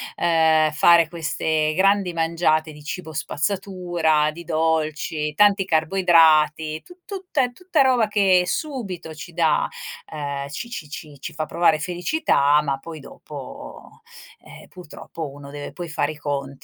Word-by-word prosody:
ehm, 160 Hz, -2 st, +3 dB
fare 170 Hz, +1 st, +5 dB
queste 160 Hz, -2 st, -1 dB
grandi 195 Hz, -1 st, +2 dB
mangiate 165 Hz, -1 st, +1 dB
di 150 Hz, 0 st, -13 dB
cibo 160 Hz, +2 st, -6 dB
spazzatura, 170 Hz, -1 st, 0 dB
di 170 Hz, +2 st, -10 dB
dolci, 155 Hz, -1 st, -1 dB
tanti 200 Hz, +2 st, +4 dB
carboidrati, 160 Hz, -3 st, +3 dB
tu 355 Hz, -, -16 dB
tutta 375 Hz, -7 st, -2 dB
è 245 Hz, -, -2 dB
tutta 360 Hz, -1 st, 0 dB
roba 250 Hz, -5 st, +3 dB
che 195 Hz, -4 st, +3 dB
subito 190 Hz, -, -4 dB
ci 170 Hz, +2 st, -10 dB
dà, 160 Hz, -2 st, +2 dB, 0.5 s
ehm, 140 Hz, -2 st, -4 dB
ci 195 Hz, +11 st, -6 dB
ci 155 Hz, -11 st, -7 dB
ci 145 Hz, -1 st, -9 dB
ci -, -, -7 dB
fa 155 Hz, +1 st, -3 dB
provare 170 Hz, -2 st, +2 dB
felicità, 175 Hz, -, +2 dB
ma 140 Hz, -2 st, -2 dB
poi 160 Hz, +3 st, -9 dB
dopo, 295 Hz, -, -11 dB, 0.4 s
ehm, -, -, -14 dB
purtroppo 165 Hz, -3 st, -9 dB
uno 140 Hz, 0 st, -11 dB
deve 145 Hz, 0 st, -7 dB
poi 175 Hz, -2 st, -7 dB
fare 155 Hz, -, -1 dB
i 155 Hz, -, -10 dB
conti 140 Hz, -2 st, -3 dB
160 Hz, 145 wpm, -22 LUFS, 155-185 Hz, 0.5 s, fare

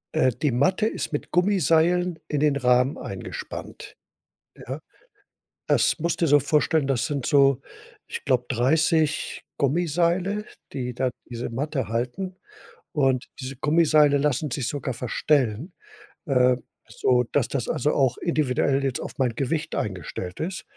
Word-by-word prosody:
Äh, 130 Hz, 0 st, +4 dB
die 145 Hz, -4 st, +2 dB
Matte 185 Hz, -, +2 dB
ist 160 Hz, -, -4 dB
mit 145 Hz, -, -3 dB
Gummiseilen 180 Hz, -1 st, +2 dB
in 150 Hz, -, -1 dB
den 150 Hz, -1 st, +3 dB
Rahmen 125 Hz, +1 st, +3 dB
eingespannt, -, -, -7 dB, 0.7 s
ja? -, -, -4 dB, 0.9 s
Das -, -, +3 dB
musste 170 Hz, +1 st, 0 dB
dir 155 Hz, -, +1 dB
so 145 Hz, -, +6 dB
vorstellen, 150 Hz, -1 st, +2 dB
das 125 Hz, -4 st, +1 dB
sind 140 Hz, -4 st, -3 dB
so, 140 Hz, -2 st, +4 dB, 0.5 s
ich -, -, -6 dB
glaube, 125 Hz, -2 st, +2 dB
30 155 Hz, +4 st, +1 dB
Gummiseile, 175 Hz, +7 st, +1 dB, 0.3 s
die 125 Hz, -3 st, -3 dB
da 130 Hz, +1 st, 0 dB, 0.2 s
diese 120 Hz, 0 st, -4 dB
Matte 135 Hz, +1 st, -2 dB
halten. 125 Hz, -, -3 dB, 0.6 s
Und 135 Hz, -4 st, +2 dB, 0.2 s
diese 130 Hz, 0 st, -6 dB
Gummiseile 150 Hz, -1 st, +4 dB
lassen 145 Hz, +1 st, 0 dB
sich 125 Hz, -3 st, -2 dB
sogar 140 Hz, -3 st, -3 dB
verstellen, 125 Hz, -, 0 dB, 0.5 s
äh, 125 Hz, -2 st, +4 dB, 0.3 s
sodass 125 Hz, +1 st, +1 dB
das 130 Hz, -4 st, -3 dB
also 150 Hz, -, +1 dB
auch 130 Hz, -3 st, +2 dB
individuell 140 Hz, -4 st, +1 dB
jetzt 135 Hz, -3 st, -1 dB
auf -, -, -7 dB
mein 125 Hz, -4 st, 0 dB
Gewicht 155 Hz, +4 st, -2 dB
eingestellt 90 Hz, -2 st, -4 dB
ist 175 Hz, +2 st, -3 dB
140 Hz, 135 wpm, -25 LUFS, 125-160 Hz, 0.9 s, so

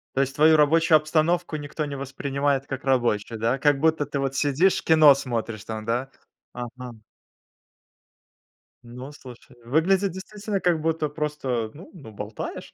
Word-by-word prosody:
То 135 Hz, -, +1 dB
есть 135 Hz, 0 st, -2 dB
твою 155 Hz, +2 st, +5 dB
рабочую 160 Hz, +2 st, +4 dB
обстановку 155 Hz, +2 st, 0 dB
никто 150 Hz, +1 st, -5 dB
не 140 Hz, -1 st, -5 dB
воспринимает 140 Hz, 0 st, -2 dB
как 135 Hz, 0 st, -6 dB
рабочую, 120 Hz, -4 st, 0 dB
да? 115 Hz, +4 st, 0 dB
Как 145 Hz, 0 st, +2 dB
будто 160 Hz, 0 st, +1 dB
ты 140 Hz, 0 st, -4 dB
вот 135 Hz, -1 st, -2 dB
сидишь, 145 Hz, +7 st, +2 dB
кино 155 Hz, -3 st, +7 dB
смотришь 115 Hz, -5 st, -4 dB
там, 110 Hz, -1 st, -6 dB
да? 120 Hz, +4 st, -2 dB, 0.4 s
Ага. 125 Hz, -1 st, -8 dB, 1.8 s
Ну 125 Hz, +4 st, -9 dB
слушай, 125 Hz, -2 st, -14 dB
выглядит 180 Hz, +9 st, +2 dB
действительно 205 Hz, +2 st, -5 dB
как 175 Hz, -3 st, +1 dB
будто 160 Hz, -1 st, -1 dB
просто, 145 Hz, -7 st, -3 dB
ну 165 Hz, +6 st, -13 dB
ну, 140 Hz, -, -12 dB
болтаешь. 105 Hz, +1 st, -7 dB
140 Hz, 145 wpm, -24 LUFS, 125-155 Hz, 1.8 s, кино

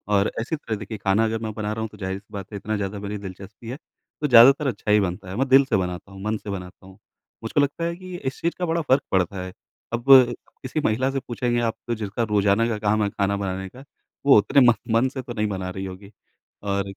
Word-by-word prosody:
और 100 Hz, -, +2 dB
ऐसी 120 Hz, +8 st, -2 dB
तरह 115 Hz, -7 st, -4 dB
देखिए 105 Hz, +1 st, -7 dB
खाना 100 Hz, +2 st, +2 dB
अगर 110 Hz, 0 st, -1 dB
मैं 110 Hz, -, -3 dB
बना 105 Hz, 0 st, -3 dB
रहा 110 Hz, -, -4 dB
हूँ 110 Hz, -, -3 dB
तो 105 Hz, -, -15 dB
जाहिर 95 Hz, -1 st, -4 dB
सी 100 Hz, -, -26 dB
बात 100 Hz, -1 st, -7 dB
है -, -, -3 dB
इतना 110 Hz, +2 st, -3 dB
ज़्यादा 100 Hz, 0 st, -4 dB
मेरी 105 Hz, +1 st, -5 dB
दिलचस्पी 100 Hz, +3 st, -10 dB
है, 130 Hz, -, -5 dB, 0.4 s
तो 150 Hz, -, +1 dB
ज़्यादातर 135 Hz, +3 st, +7 dB
अच्छा 105 Hz, -4 st, -2 dB
ही 105 Hz, -, +6 dB
बनता 95 Hz, 0 st, -3 dB
है। 95 Hz, -, -5 dB
मैं 135 Hz, -, +1 dB
दिल 135 Hz, +1 st, +7 dB
से 130 Hz, -, +1 dB
बनाता 90 Hz, +1 st, -4 dB
हूँ 95 Hz, 0 st, -10 dB
मन 110 Hz, +1 st, -1 dB
से 105 Hz, -, -10 dB
बनाता 90 Hz, -1 st, -7 dB
हूँ। 95 Hz, -, -15 dB, 0.5 s
मुझको 115 Hz, +6 st, +1 dB
लगता 145 Hz, +4 st, -1 dB
है 170 Hz, 0 st, -2 dB
कि 185 Hz, 0 st, -9 dB
इस 130 Hz, -, -3 dB
चीज़ 170 Hz, -, 0 dB
का 180 Hz, -, 0 dB
बड़ा 165 Hz, 0 st, 0 dB
फर्क 135 Hz, -2 st, +3 dB
पड़ता 95 Hz, 0 st, +1 dB
है। 95 Hz, -, -8 dB, 0.4 s
अब 120 Hz, +1 st, -2 dB, 0.6 s
किसी 130 Hz, +4 st, -2 dB
महिला 125 Hz, +5 st, +1 dB
से 135 Hz, -, -1 dB
पूछेंगे 120 Hz, 0 st, -1 dB
आप 115 Hz, -1 st, 0 dB, 0.2 s
जिसका 110 Hz, 0 st, -2 dB
रोज़ाना 105 Hz, +2 st, +3 dB
का 115 Hz, -2 st, -1 dB
काम 105 Hz, 0 st, +1 dB
है 100 Hz, -, 0 dB
खाना 100 Hz, 0 st, -1 dB
बनाने 95 Hz, -1 st, -3 dB
का 130 Hz, +7 st, -13 dB, 0.4 s
वो 140 Hz, -5 st, +8 dB
उतने 135 Hz, +7 st, +4 dB
म -, -, +6 dB, 0.2 s
मन 120 Hz, +3 st, +4 dB
से 130 Hz, -1 st, -6 dB
तो 120 Hz, -, -7 dB
नहीं 105 Hz, -2 st, -1 dB
बना 95 Hz, -2 st, -4 dB
रही 95 Hz, +1 st, -5 dB
होगी। 95 Hz, +2 st, -9 dB, 0.5 s
और 100 Hz, -1 st, 0 dB
105 Hz, 250 wpm, -24 LUFS, 100-125 Hz, 0.6 s, वो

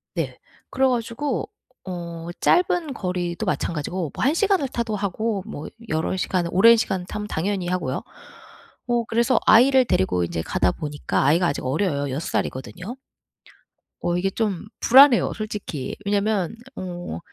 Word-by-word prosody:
네. -, -, -3 dB, 0.3 s
그래 265 Hz, 0 st, +2 dB
가지고 245 Hz, +2 st, -2 dB, 0.4 s
어 170 Hz, -2 st, -6 dB
짧은 350 Hz, -4 st, +2 dB
거리도 180 Hz, -5 st, -3 dB
마찬가지고 165 Hz, 0 st, -2 dB
뭐 -, -, -3 dB
한 275 Hz, -, +3 dB
시간을 380 Hz, -5 st, +2 dB
타도 235 Hz, -4 st, -2 dB
하고 205 Hz, +1 st, -2 dB
뭐 155 Hz, -8 st, -6 dB, 0.2 s
여러 160 Hz, +4 st, 0 dB
시간을 175 Hz, -1 st, 0 dB
오랜 230 Hz, +5 st, +7 dB
시간 185 Hz, -4 st, -1 dB
타면 210 Hz, +2 st, -5 dB
당연히 185 Hz, +1 st, -2 dB
하고요. 180 Hz, 0 st, -2 dB, 0.8 s
뭐 240 Hz, -1 st, +1 dB
그래서 235 Hz, +1 st, +2 dB
아이를 255 Hz, +3 st, +6 dB
데리고 90 Hz, -, +1 dB
인제 85 Hz, -1 st, -2 dB
가다 90 Hz, +2 st, +1 dB
보니까 150 Hz, -3 st, -2 dB
아이가 170 Hz, +5 st, +4 dB
아직 140 Hz, -, -2 dB
어려요. 145 Hz, 0 st, 0 dB
6 145 Hz, +6 st, -3 dB
살이거든요. 180 Hz, -, -4 dB, 1.0 s
어 175 Hz, 0 st, 0 dB
이게 195 Hz, +2 st, +1 dB
좀 200 Hz, -3 st, -2 dB
불안해요. 265 Hz, 0 st, +6 dB
솔직히. 205 Hz, -10 st, -5 dB
왜냐면 205 Hz, -1 st, 0 dB, 0.2 s
어 175 Hz, -, -6 dB
190 Hz, 310 characters per minute, -23 LUFS, 170-230 Hz, 1.0 s, 오랜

